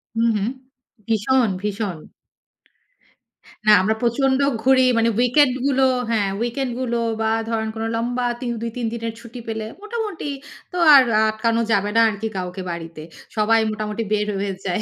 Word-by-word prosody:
হুম, 230 +1 +2
হুম। 205 +2 -1 0.6
ভীষণ, 230 +2 +2
ভীষণ! 205 -3 -3 1.7
না, 215 - +6
আমরা 215 +4 +1
প্রচণ্ড 265 +3 +1 0.2
ঘুরি। 260 0 +5
মানে 230 0 +3
weekend 255 +1 +4
গুলো 270 -1 +2 0.3
হ্যাঁ 210 -4 +1
weekend 240 +3 -2
গুলো 240 -2 -1 0.2
বা, 220 - +1 0.2
ধরেন 220 -1 -1
কোনো 225 0 -3
লম্বা 245 +2 -1 0.2
৩, 245 -2 -2
২-৩ 235 +1 -4
দিনের 230 -1 -4
ছুটি 235 +1 -10
পেলে, 220 -1 -3 0.2
মোটামুটি 425 -6 -4 0.4
তো 360 - -5 0.2
আর 275 - +10 0.3
আটকানো 230 +1 0
যাবে 205 -1 +2
না - - +7
আরকি 215 +1 -4
কাউকে 180 +1 -5
বাড়িতে। 165 -2 -7 0.4
সবাই 220 +1 +3
মোটামুটি 215 +1 -3
বের 210 0 +1
হয়ে 200 0 -2
যায়। 185 +2 -1
230 Hz, 150 wpm, -21 LUFS, 210-250 Hz, 1.7 s, আর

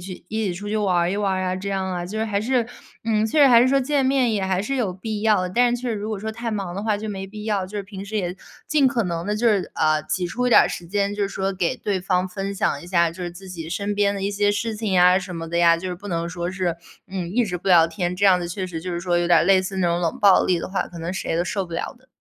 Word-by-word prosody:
去 180 -1 -9
一 220 -1 -2
起 175 - -2
出 205 +4 -7
去 215 - -1
玩 195 -4 +1
儿 175 0 +2
一 195 - -1
玩 205 -2 0
儿 185 0 -1
啊， 185 0 -1
这 190 +2 -5
样 190 -1 -2
啊， 175 -1 -3
就 210 +5 -5
是 220 - 0
还 205 -2 -1
是， 240 0 +1 0.4
嗯， 220 -1 +1
确 290 +7 +1
实 280 - +8
还 240 -3 +7
是 250 - +4
说 275 0 +3
见 280 +1 +1
面 260 -3 +2
也 200 -3 0
还 190 -1 0
是 245 +7 -2
有 220 -8 0
必 210 +3 -5
要。 210 -5 +3
但 240 +5 +2
是 245 - -9
确 255 - -3
实 - - -1
如 210 +1 -4
果 215 -2 -3
说 220 +2 -4
太 230 +1 -4
忙 195 -5 -3
的 200 - -4
话 215 -1 +1
就 215 +1 -6
没 195 -1 -4
必 210 +2 -9
要， 205 -4 0
就 205 +2 -6
是 200 - -5
平 195 -1 -8
时 210 +2 -5
也 180 -3 -2 0.3
尽 295 -4 +3
可 240 -4 0
能 170 -2 -3
地 210 +1 -1
就 235 +2 +1
是， 205 -4 +2
啊， 155 -1 +2
挤 180 +3 -2
出 250 +8 -2
一 - - -2
点 - - +8
儿 - - 0
时 175 - -6
间， 200 +1 0
就 205 - -2
是 195 - 0
说 195 0 -2
给 180 -2 -1
对 200 -3 -2
方 185 0 0
分 195 +2 -4
享 145 -7 -1
一 175 - -11
下， 170 -2 +2
就 180 - -8
是 175 - -3
自 190 +2 -12
己 165 -3 -7
身 200 +4 -2
边 205 0 +2
的 200 - -5
一 - - +1
些 205 0 +1
事 220 +2 -2
情 210 -2 -3
呀 180 0 +6
什 180 -2 -7
么 165 - -5
的 170 - -3
呀， 170 -1 +5
就 185 +3 -5
是 180 - -3
不 200 +4 -10
能 170 -1 -2
说 175 0 -4
是， 185 -3 -1 0.3
嗯， 185 -3 -5
一 240 +4 +2
直 180 -4 -3
不 190 +3 -5
聊 170 -3 +7
天， 180 0 -3
这 200 - +3
样 185 -2 +5
子 175 - -4
确 185 +1 -4
实 165 -3 -6
就 180 +1 -5
是 170 - -3
说 175 -1 +1
有 175 - 0
点 170 -1 +5
儿 - - +2
类 190 +1 +5
似 190 +1 -5
那 180 - +2
种 170 0 +1
冷 170 -2 -1
暴 200 -3 +6
力 180 -2 +2
的 - - -5
话， 190 -1 -1
可 170 - -11
能 170 +2 -4
谁 190 - -3
都 170 - +2
受 195 +1 -2
不 170 - -12
了 165 - -3
的。 260 - -28
195 Hz, 355 characters per minute, -23 LUFS, 180-210 Hz, 0.4 s, 实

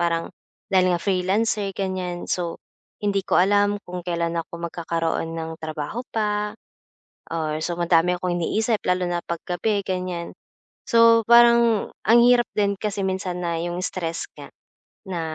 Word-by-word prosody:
parang 170 -1 -1 0.4
dahil 185 -1 +4
nga 175 - +1
freelancer, 195 +3 0
ganiyan. 185 -2 -3
So 175 -2 -2 0.4
hindi 200 -1 0
ko - - +1
alam 205 +2 +3
kung 180 0 -5
kailan 170 -1 -2
ako 170 - -9
magkakaroon 165 -1 -2
ng 160 0 -6
trabaho 155 +8 -4
pa 210 -1 -1 0.8
or 155 -2 -2
so 175 0 -3
madami 170 +1 +3
akong 180 -1 -1
iniisip 220 +6 0
lalo 180 0 +1
na 175 0 -2
'pag 170 -1 -3
gabi, 200 +3 0
ganiyan. 180 -2 -3 0.5
So 230 -1 +5
parang 235 -2 +5 0.2
ang 235 +2 +7
hirap 245 -1 +5
din 200 -2 +1
kasi 205 -2 -2
minsan 185 -1 -2
na 170 -1 -1
'yong 175 +1 -3
stress 165 -3 -4
nga - - -9 0.6
na 175 -3 -3
180 Hz, 150 wpm, -23 LUFS, 170-205 Hz, 0.8 s, ang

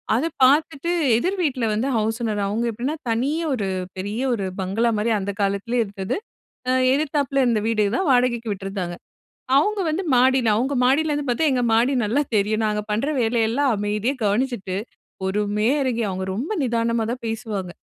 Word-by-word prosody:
அதை 270 +8 +1 0.2
பாத்துட்டு 295 +4 +3 0.3
எதிர் 370 +10 -1
வீட்ல 260 -6 0
வந்து 225 +6 0
ஹவுஸ் 220 +1 -1
ஓனர். 210 -2 -1
அவுங்க 220 +4 -1
எப்டின்னா, 250 +7 -3
தனியா 280 +9 0
ஒரு 205 -5 -2 0.3
பெரிய 205 +5 -3
ஒரு 200 -5 -2 0.2
பங்களா 205 +6 +1
மாரி, 220 +3 0
அந்த 200 +1 -3
காலத்திலேயே 200 +5 0
இருந்தது. 195 - -4 0.5
ஆ - - +3 0.2
எதித்தாப்பில 280 -1 +1
இருந்த 235 -3 +2
வீடு 215 -2 +2
தான் 380 - 0
வாடகைக்கு 245 -3 +2
விட்டுருந்தாங்க. 195 -3 -4 0.6
அவுங்க 415 +7 +1
வந்து, 350 +5 -2
மாடில 255 -2 +4
அவுங்க 265 +5 0
மாடியிலருந்து 290 +2 +1
பாத்தா, 245 +7 +1
எங்க 250 -1 +1
மாடி 240 +4 +3
நல்லா 240 +8 +1
தெரியும். 215 +2 +1
நாங்க 210 0 -1
பண்ற 225 +7 0
வேலையெல்லாம் 235 +3 +1
அமைதியா 210 +5 -1
கவனிச்சிட்டு, 205 -3 -1 0.5
பொறுமையா 210 +5 +1
இறங்கி 245 -3 -1
அவுங்க 190 0 -3
ரொம்ப 260 - -3
நிதானமா 230 -1 0
தான் 250 0 -6
பேசுவாங்க. 215 -5 -4
230 Hz, 160 wpm, -22 LUFS, 210-265 Hz, 0.6 s, மாடில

